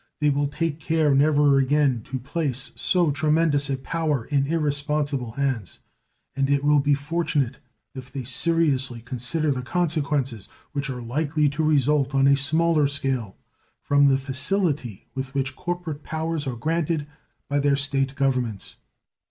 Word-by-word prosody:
They 150 Hz, -1 st, +3 dB
will 145 Hz, +1 st, +1 dB
take 160 Hz, +1 st, -2 dB
care 160 Hz, -2 st, +2 dB
never 145 Hz, 0 st, +4 dB
again 135 Hz, -2 st, +2 dB
to 130 Hz, -, -4 dB
place 135 Hz, 0 st, -2 dB
so 175 Hz, -4 st, +2 dB
tremendous 150 Hz, -1 st, +1 dB
a 135 Hz, -, 0 dB
power 150 Hz, -2 st, -2 dB
in 140 Hz, -2 st, 0 dB
irresponsible 145 Hz, -5 st, -1 dB
hands, 130 Hz, -8 st, -2 dB, 0.6 s
and 135 Hz, 0 st, 0 dB
it 140 Hz, 0 st, +2 dB
will 145 Hz, 0 st, +4 dB
be 145 Hz, +1 st, +3 dB
fortunate 145 Hz, -3 st, -1 dB, 0.3 s
if 130 Hz, -1 st, -9 dB
they 135 Hz, -1 st, -5 dB
seriously 135 Hz, -2 st, 0 dB
consider 130 Hz, +6 st, -2 dB
the 130 Hz, -2 st, -2 dB
consequences 145 Hz, -, -1 dB, 0.2 s
which 140 Hz, -1 st, -3 dB
are 125 Hz, -2 st, -5 dB
likely 145 Hz, +4 st, 0 dB
to 145 Hz, +3 st, -3 dB
result 145 Hz, -2 st, +2 dB
on 135 Hz, 0 st, +4 dB
a 140 Hz, 0 st, +6 dB
smaller 155 Hz, +2 st, +3 dB
scale 135 Hz, -7 st, -2 dB, 0.5 s
from 145 Hz, 0 st, +4 dB
the 135 Hz, -1 st, +4 dB
facility 135 Hz, -, -2 dB
with 135 Hz, +1 st, -5 dB
which 130 Hz, -1 st, -1 dB
corporate 175 Hz, -4 st, -4 dB
powers 160 Hz, -1 st, -3 dB
are 125 Hz, -, -2 dB
granted 160 Hz, +3 st, -1 dB, 0.4 s
by 145 Hz, 0 st, 0 dB
their 140 Hz, 0 st, +3 dB
State 135 Hz, -1 st, 0 dB
governments. 125 Hz, -7 st, -1 dB
140 Hz, 150 wpm, -24 LUFS, 135-155 Hz, 0.6 s, a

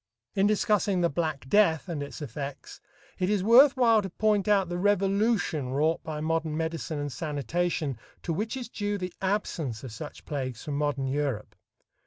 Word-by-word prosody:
In 195 Hz, +1 st, +3 dB
discussing 205 Hz, -3 st, +2 dB
the 170 Hz, -, +2 dB
"black 155 Hz, -3 st, -2 dB
death" 165 Hz, -1 st, +3 dB
and 165 Hz, -5 st, -3 dB
its 145 Hz, +2 st, -6 dB
effects, 140 Hz, +1 st, -7 dB, 0.4 s
it 185 Hz, -, +1 dB
is 205 Hz, -3 st, +1 dB
worth 260 Hz, +6 st, +7 dB
while 230 Hz, -4 st, +5 dB
to 195 Hz, -, -5 dB
point 210 Hz, +1 st, +1 dB
out 200 Hz, -3 st, +3 dB
the 175 Hz, +1 st, -3 dB
revolution 200 Hz, -, +1 dB
wrought 155 Hz, +5 st, +1 dB
by 155 Hz, -1 st, -4 dB
modern 160 Hz, -1 st, -1 dB
medicine 160 Hz, -1 st, -3 dB
and 145 Hz, 0 st, -3 dB
sanitation 150 Hz, -1 st, -2 dB, 0.2 s
to 170 Hz, -, -1 dB
which 215 Hz, +8 st, -2 dB
is 250 Hz, -, -5 dB
due 205 Hz, -2 st, -2 dB
the 180 Hz, -2 st, -5 dB
absence 170 Hz, -, -2 dB
of 130 Hz, -, -7 dB
such 145 Hz, +7 st, -9 dB
plagues 130 Hz, -5 st, -4 dB
from 145 Hz, -, -4 dB
modern 145 Hz, -2 st, 0 dB
Europe. 135 Hz, -5 st, -2 dB
165 Hz, 175 wpm, -28 LUFS, 145-205 Hz, 0.4 s, worth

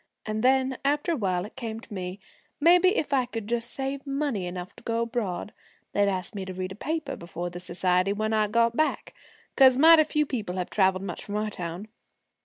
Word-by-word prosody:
And 215 Hz, 0 st, -2 dB
then, 260 Hz, 0 st, +2 dB
after 290 Hz, +4 st, +1 dB
a -, -, +1 dB
while 185 Hz, -7 st, -1 dB
it 210 Hz, -, -12 dB
came 225 Hz, -2 st, -5 dB
to 235 Hz, -2 st, -12 dB
me, 185 Hz, 0 st, -5 dB, 0.4 s
maybe 360 Hz, +6 st, +5 dB
if 285 Hz, -, -1 dB
I 255 Hz, -3 st, +2 dB
could 225 Hz, -3 st, -5 dB
just 235 Hz, +1 st, -1 dB
save 275 Hz, +2 st, -4 dB
money 275 Hz, -9 st, -1 dB
enough 180 Hz, 0 st, -7 dB
to -, -, -13 dB
go 230 Hz, 0 st, 0 dB
abroad, 220 Hz, -5 st, -3 dB, 0.4 s
they'd 205 Hz, 0 st, +2 dB
ask 185 Hz, +1 st, -3 dB
me 200 Hz, -2 st, -4 dB
to 185 Hz, -1 st, -7 dB
read 185 Hz, 0 st, -4 dB
a -, -, -7 dB
paper 305 Hz, +4 st, -3 dB
before 175 Hz, +1 st, -6 dB
the 175 Hz, -, -7 dB
society 180 Hz, +1 st, +1 dB
when 215 Hz, +2 st, -1 dB
I 215 Hz, -1 st, +2 dB
got 230 Hz, +2 st, +2 dB
back, 310 Hz, +3 st, 0 dB, 0.4 s
'cause 260 Hz, -2 st, +7 dB
mighty 320 Hz, +2 st, +8 dB
few 300 Hz, 0 st, 0 dB
people 215 Hz, -10 st, -4 dB
have 180 Hz, -, -3 dB
traveled 190 Hz, -2 st, +2 dB
much 180 Hz, -3 st, -5 dB
from 205 Hz, -, -6 dB
our 215 Hz, 0 st, -1 dB
town. 180 Hz, +2 st, -6 dB
220 Hz, 210 wpm, -27 LUFS, 185-270 Hz, 0.4 s, mighty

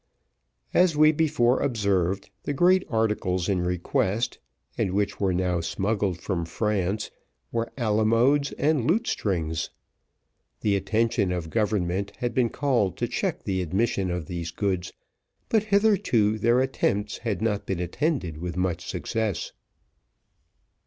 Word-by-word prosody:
As 175 Hz, -4 st, +4 dB
we 155 Hz, 0 st, +7 dB
before 145 Hz, -6 st, +2 dB
observed, 100 Hz, -7 st, 0 dB
the 145 Hz, -, -3 dB
great 185 Hz, +5 st, +4 dB
articles 105 Hz, -6 st, 0 dB
in 95 Hz, -3 st, +1 dB
request, 90 Hz, +5 st, -1 dB, 0.4 s
and 95 Hz, -, -1 dB
which 100 Hz, +1 st, 0 dB
were 95 Hz, -2 st, +2 dB
now 90 Hz, -1 st, 0 dB
smuggled 95 Hz, +1 st, -1 dB
from 90 Hz, -4 st, -2 dB
France, 100 Hz, +3 st, -1 dB, 0.4 s
were 115 Hz, 0 st, -2 dB
alamodes 115 Hz, +5 st, +2 dB
and 145 Hz, -4 st, +1 dB
lutestrings. 90 Hz, -, 0 dB, 0.9 s
The 105 Hz, -2 st, +2 dB
attention 110 Hz, 0 st, +1 dB
of 85 Hz, -3 st, -3 dB
government 100 Hz, -3 st, 0 dB
had 120 Hz, -1 st, -2 dB
been 120 Hz, -1 st, +2 dB
called 120 Hz, -, 0 dB
to -, -, -1 dB
check -, -, -2 dB
the 95 Hz, -1 st, -1 dB
admission 95 Hz, +2 st, 0 dB
of 90 Hz, -2 st, -3 dB
these 85 Hz, +1 st, -4 dB
goods, 95 Hz, 0 st, -2 dB, 0.6 s
but 220 Hz, -2 st, +2 dB
hitherto 200 Hz, -, +3 dB
their 120 Hz, +4 st, +3 dB
attempts 105 Hz, -6 st, -1 dB
had 105 Hz, -6 st, -2 dB
not 105 Hz, -2 st, -1 dB
been 95 Hz, -3 st, -2 dB
attended 90 Hz, -, -1 dB
with 85 Hz, 0 st, -4 dB
much 90 Hz, -2 st, -1 dB
success. 110 Hz, -6 st, -2 dB
105 Hz, 130 wpm, -26 LUFS, 90-120 Hz, 0.9 s, we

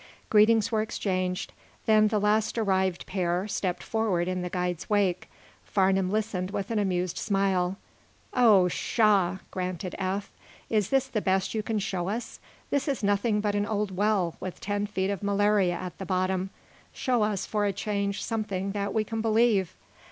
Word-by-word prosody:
Greetings 215 Hz, +1 st, +5 dB
were 220 Hz, -1 st, +2 dB
exchanged. 185 Hz, -4 st, -2 dB, 0.3 s
Then 215 Hz, -1 st, +5 dB
the 215 Hz, 0 st, +1 dB
last 210 Hz, +2 st, +1 dB
arrived 190 Hz, -4 st, +1 dB
pair 180 Hz, 0 st, -1 dB
stepped 185 Hz, -3 st, -2 dB
forward 205 Hz, -6 st, 0 dB
in 185 Hz, 0 st, -1 dB
the 180 Hz, -, -3 dB
guide's 180 Hz, -2 st, -3 dB
wake. 195 Hz, -4 st, +1 dB, 0.3 s
Farnum 190 Hz, -1 st, +2 dB
listened 200 Hz, -3 st, -1 dB
with 200 Hz, +1 st, -4 dB
an 220 Hz, -, +1 dB
amused 185 Hz, -3 st, -1 dB
smile. 195 Hz, -3 st, +1 dB, 0.6 s
"Oh, 215 Hz, -7 st, +6 dB
pshaw!" 195 Hz, -1 st, +2 dB
grunted 185 Hz, 0 st, -4 dB
Eph. 195 Hz, +1 st, -2 dB, 0.4 s
"Is 210 Hz, -4 st, +2 dB
this 270 Hz, -1 st, +2 dB
the 235 Hz, -5 st, -2 dB
best 190 Hz, -1 st, +1 dB
you 220 Hz, -, 0 dB
can 220 Hz, 0 st, -2 dB
show 190 Hz, -3 st, -2 dB
us? 225 Hz, +3 st, -4 dB, 0.3 s
This 285 Hz, +1 st, 0 dB
is 275 Hz, -5 st, -1 dB
nothing 205 Hz, +1 st, +2 dB
but 205 Hz, -1 st, 0 dB
an 205 Hz, 0 st, 0 dB
old 205 Hz, -3 st, -2 dB
well, 195 Hz, -4 st, +1 dB
with 185 Hz, -, -6 dB
ten 205 Hz, +1 st, -2 dB
feet 190 Hz, -1 st, -1 dB
of 200 Hz, -, -4 dB
malaria 200 Hz, -2 st, +2 dB
at 180 Hz, 0 st, -6 dB
the 195 Hz, -, -5 dB
bottom. 185 Hz, 0 st, 0 dB, 0.4 s
Show 250 Hz, -4 st, 0 dB
us, 210 Hz, -2 st, 0 dB
for 210 Hz, -1 st, 0 dB
a 200 Hz, -, +2 dB
change, 200 Hz, 0 st, -2 dB
something 200 Hz, -4 st, -2 dB
that 200 Hz, 0 st, -3 dB
we 220 Hz, -, +2 dB
can 225 Hz, +1 st, -3 dB
believe." 220 Hz, -4 st, +2 dB
200 Hz, 170 wpm, -27 LUFS, 185-215 Hz, 0.6 s, Oh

